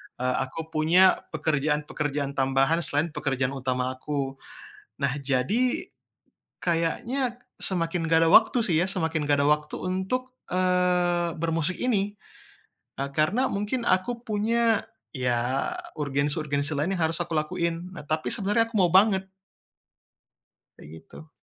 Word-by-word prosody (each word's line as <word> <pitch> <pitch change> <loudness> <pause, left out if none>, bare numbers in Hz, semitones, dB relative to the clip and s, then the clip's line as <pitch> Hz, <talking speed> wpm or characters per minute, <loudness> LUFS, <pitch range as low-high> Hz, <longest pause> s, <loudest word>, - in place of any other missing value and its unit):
Eee, 125 +1 -1
aku 160 +5 -6
punya, 165 +4 +4 0.2
pekerjaan-pekerjaan 150 -1 -1
tambahan 135 +4 +2
selain 155 +1 0
pekerjaan 135 -4 -1
utama 130 -1 -1
aku. 135 0 -4 0.6
Nah 140 -2 +2
jadi, 145 - 0 0.7
kayaknya 235 +10 -1 0.2
semakin 170 -2 -1
nggak 160 0 +4
ada - - +3
waktu 225 +2 +6
sih 170 - +1
ya, 180 - +2
semakin 160 -5 -1
nggak 145 -1 +2
ada - - +2
waktu 150 0 0
untuk, 190 +8 -2 0.2
eee, 180 -1 +2
bermusik 165 +1 0
ini. 205 -5 0 0.8
E - - -1
karena 185 +12 +2
mungkin 210 +5 -2
aku 190 +6 +1
punya, 225 +1 +1 0.3
ya 125 0 0 0.3
urgensi-urgensi 145 +1 -1
lain 160 +7 0
yang 170 - +1
harus 165 - -2
aku 170 - -7
lakuin. 170 +3 -2
Nah - - -8
tapi 155 +1 -1
sebenarnya 220 +2 +1
aku - - -22
mau 180 -2 +4
banget. 190 0 +4 1.5
Kaya - - -13
gitu. 155 - -14
165 Hz, 130 wpm, -26 LUFS, 145-190 Hz, 1.5 s, waktu